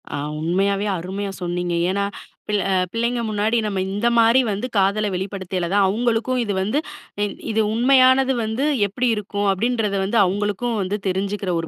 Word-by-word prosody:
ஆ. - - -3 0.2
உண்மையாவே 195 +5 0
அருமையா 195 +3 -4
சொன்னீங்க. 175 0 -2 0.2
ஏன்னா 200 +1 0 0.4
பிள்ள 205 -2 +1
அ - - +2 0.2
பிள்ளைங்க 235 +1 0
முன்னாடி 215 +2 0
நம்ம 200 -2 -2
இந்த 205 +4 0
மாரி 230 +3 +5
வந்து 205 +4 -2
காதல 200 +2 +2
வெளிப்படுத்தியல 185 -2 -3
தான் 200 0 +4
அவங்களுக்கும் 235 +4 0
இது 210 -4 -1
வந்து 210 +9 0 0.7
இது 220 0 +2
உண்மையானது 260 +2 +4
வந்து 220 +5 -1 0.2
எப்படி 245 +6 -1
இருக்கும் 205 -1 -2
அப்படின்றது 215 0 0
வந்து 205 +4 0
அவங்களுக்கும் 205 +5 -1
வந்து 195 +2 -2
தெரிஞ்சுக்கிற 195 +1 -2
ஒரு 165 - -4
205 Hz, 155 wpm, -21 LUFS, 195-230 Hz, 0.7 s, மாரி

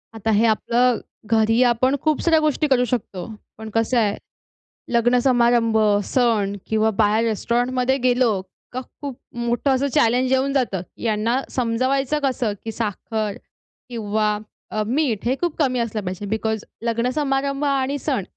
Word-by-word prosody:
आता 220 0 -1
हे 215 +2 +3
आपलं, 235 +2 +2 0.3
घरी 225 +1 +3
आपण 250 +2 +2
खूप 310 -1 +2
साऱ्या 325 -2 +4
गोष्टी 305 0 +1
करू 255 -3 +3
शकतो. 210 -7 -3 0.3
पण 220 0 -8
कसं 225 +2 +1
आहे, 210 -3 +2 0.8
लग्न 240 +1 +3
समारंभ 235 -3 +3 0.3
सण 220 -6 +1
किंवा 220 0 +2
बाहेर 215 +2 +3
रेस्टॉरंटमध्ये 245 +4 0
गेलो 245 -2 +3 0.4
का 255 +1 -4 0.2
खूप 280 -4 -5 0.2
मोठं 240 +3 0
असं 275 +2 0
चॅलेंज 250 +3 +3
येऊन 265 +1 +2
जातं. 240 -10 0 0.2
यांना 230 +3 0
समजायचं 260 +4 0
कसं 250 -5 0
की 225 - -4
साखर 215 -1 -3 0.5
किंवा 215 -2 -1 0.3
अ, 215 - -1
मीठ 250 -5 0
हे 250 +2 +2
खूप 345 -3 -1
कमी 255 -4 +1
असलं 225 -2 -2
पाहिजे 185 +2 -4
बिकॉज 220 0 -1 0.2
लग्नसमारंभ 270 +4 0
आणि 275 0 0
सण 260 -9 -1
240 Hz, 145 wpm, -22 LUFS, 220-260 Hz, 0.8 s, साऱ्या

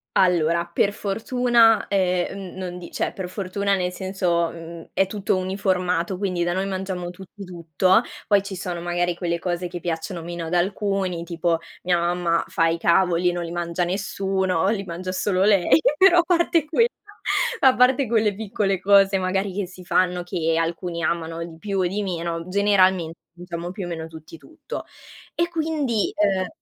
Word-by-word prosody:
Allora, 170 -2 +3
per 185 +4 +1
fortuna, 225 +2 +3
ehm, 185 0 -1
mhmm, - - -12
non 180 -1 -5
di 175 - -9
cioè, - - -1
per 185 -2 -5
fortuna 200 +1 -1
nel 180 -1 -1
senso, 180 -3 0
mhmm, 165 0 -9
è 195 - +3
tutto 195 -1 -1
uniformato 185 -2 -1
quindi 185 -3 -1
da 175 0 0
noi 190 +2 -1
mangiamo 190 -2 -4
tutti 190 +3 -12
tutto, 180 +3 +2 0.3
poi 205 -2 +4
ci 195 -1 -7
sono 180 -2 -4
magari 175 0 -1
quelle 170 -1 -2
cose 175 +1 -3
che 175 0 -6
piacciono 170 +1 -4
meno 170 0 -5
ad 175 - -1
alcuni, 190 -1 0
tipo 170 -1 -1 0.2
mia 175 -1 +2
mamma 170 -1 +1
fa 165 - +1
i 165 0 0
cavoli 175 +1 +3
e - - +1
non 175 0 -3
li 170 - -6
mangia 175 0 -2
nessuno, 190 -1 0
li 205 -3 -1
mangia 180 +2 -5
solo 185 0 0
lei 195 -5 +5 0.2
però 375 -1 +6
a - - +4
parte 340 -2 +2
quell 400 +10 +3 0.7
a 260 -1 +5
parte 255 +2 +4
quelle 215 -2 +2
piccole 200 -2 -1
cose 195 0 +5
magari 190 +1 -1
che 195 -1 -2
si 180 0 -13
fanno 180 0 +1
che 165 -3 -1
alcuni 170 +1 -2
amano 165 0 -2
di 165 -1 -11
più 200 +1 -3
o 185 - +2
di 195 +4 -1
meno, 170 -3 -3
generalmente 185 -4 +2 0.2
mangiamo 175 0 -6
più 190 0 -6
o - - -6
meno 165 -2 -5
tutti 160 0 -12
tutto. 320 - -8 0.5
E 340 0 +1
quindi, 305 - -1
uhm 195 -3 +1
185 Hz, 180 wpm, -23 LUFS, 170-200 Hz, 0.7 s, però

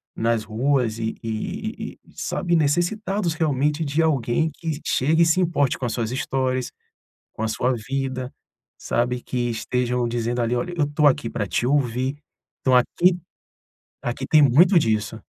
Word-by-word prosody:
nas 115 -1 0
ruas 120 0 0
e 110 0 -2
e 110 -1 -4
e - - -21
sabe, 175 -1 -1
necessitados 175 +4 0
realmente 150 -1 0
de 145 +3 +1
alguém 145 0 +1
que 160 -1 -4
chegue 160 +6 +3
e - - +4
se 165 +3 +3
importe 160 -6 +1
com 130 - -2
as 115 - -3
suas 115 -1 -2
histórias, 130 -1 -1 0.6
com - - -5
a - - 0
sua 125 +3 0
vida, 130 +2 -3 0.5
sabe. 125 +1 -1
Que 120 -1 -2
estejam 125 +1 -1
dizendo 120 +1 -1
ali 120 +1 0
olha, 175 +8 -3
eu 155 - +2
estou 150 +1 +1
aqui 135 -4 0
pra 105 - -2
te 90 +6 -1
ouvir. 130 0 0 0.4
Então 130 - +2
aqui 175 +8 +3 0.9
aqui - - -3
tem 155 -2 +6
muito 170 +8 +6
disso. 110 -3 -1
130 Hz, 160 wpm, -23 LUFS, 120-155 Hz, 0.9 s, tem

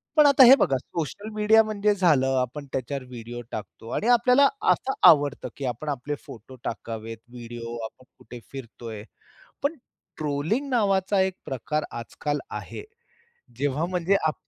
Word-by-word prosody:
पण 300 -1 +7
आता 280 -2 +7
हे 260 +3 +10
बघा 135 -7 +2
सोशल 180 - -5
मीडिया 215 +1 +5
म्हणजे 210 -1 +1
झालं, 155 -9 +3
आपण 140 +4 -5
त्याच्यावर 135 +1 -3
व्हिडिओ 120 -1 -8
टाकतो 105 +2 -8
आणि 225 - -1
आपल्याला 250 +3 +5 0.2
असं 265 - 0 0.2
आवडतं 145 -2 +4
की 140 - -4
आपण 125 +5 -3
आपले 145 +1 -3
फोटो 120 +3 -11
टाकावेत, 115 0 -5
व्हिडिओ 120 -1 -7
आपण 130 +3 -12
कुठे 120 - -11
फिरतोय. 115 -5 -8 0.6
पण 285 +4 0 0.4
ट्रोलिंग 155 - -1
नावाचा 195 -4 +2
एक 190 0 +1
प्रकार 150 +4 -2
आजकाल 130 +5 -4
आहे. 435 - -7 0.8
जेव्हा 145 +3 0
म्हणजे 180 +2 +1
आप 155 - +1
145 Hz, 145 wpm, -25 LUFS, 120-205 Hz, 0.8 s, हे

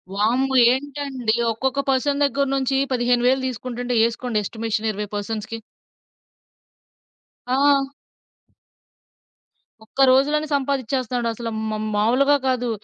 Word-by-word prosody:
వామ్మో! 250 +6 +1 0.2
ఏంటండీ? 270 -4 -3 0.2
ఒక్కొక్క 265 +4 -2
పర్సన్ 280 +2 +1
దగ్గర 280 0 +1
నుంచి 270 0 0
15,000 245 +1 +2
దీసుకుంటుంటే 245 0 -4
ఏసుకోండి 235 0 -4
ఎస్టిమేషన్ 220 +1 -3
20 210 0 -5
పర్సన్స్‌కి. 220 +2 -4 1.9
ఆ! 275 +1 +3 2.0
ఒక్క 270 +5 0
రోజులోనే 295 +4 +3
సంపాదించేస్తున్నాడసలు 250 -4 -2
మ - - -3
మ - - -2 0.2
మాములుగా 255 +7 +3
కాదు. 250 -2 0
255 Hz, 95 wpm, -22 LUFS, 230-275 Hz, 2.0 s, ఆ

